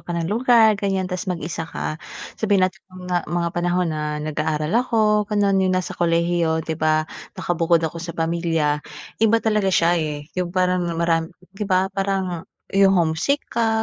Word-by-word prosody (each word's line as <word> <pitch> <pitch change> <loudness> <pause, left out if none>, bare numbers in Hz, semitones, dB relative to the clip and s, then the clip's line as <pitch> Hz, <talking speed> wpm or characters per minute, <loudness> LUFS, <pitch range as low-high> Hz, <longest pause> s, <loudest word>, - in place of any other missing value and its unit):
ka 175 -1 -5
na 165 - -1
lugar, 225 +2 +4
ganyan 195 -2 0
tapos 185 +1 -4
mag-isa 165 -2 -4
ka, 155 - -4 0.4
sabihin 200 -4 +3
natin 185 +1 -3
na 185 - -15
mga 180 -1 -2
mga 170 +1 0
panahon 175 0 0
na 150 0 -3
nag-aaral 155 +1 -2
ako, 215 -4 +2
gano'n, 200 -2 +2
yung 185 -1 +2
nasa 185 - -2
kolehiyo, 170 -1 +1
'di 160 -1 -4
ba 155 0 +2 0.3
nakabukod 170 -1 +1
ako 165 +1 -4
sa 170 0 -7
pamilya, 165 -3 0 0.4
iba 225 0 +5
talaga 210 -3 +2
siya, 175 -1 +3
eh. 150 -2 -4 0.2
Yung 175 - -1
parang 180 0 +1 0.2
maram 165 -1 +1 0.2
'di 200 +1 -5
ba 190 +1 +2
parang 190 -3 -2 0.2
yung 195 0 +4
homesick 170 - +1
ka, 225 -1 +1
175 Hz, 170 wpm, -22 LUFS, 165-195 Hz, 0.4 s, iba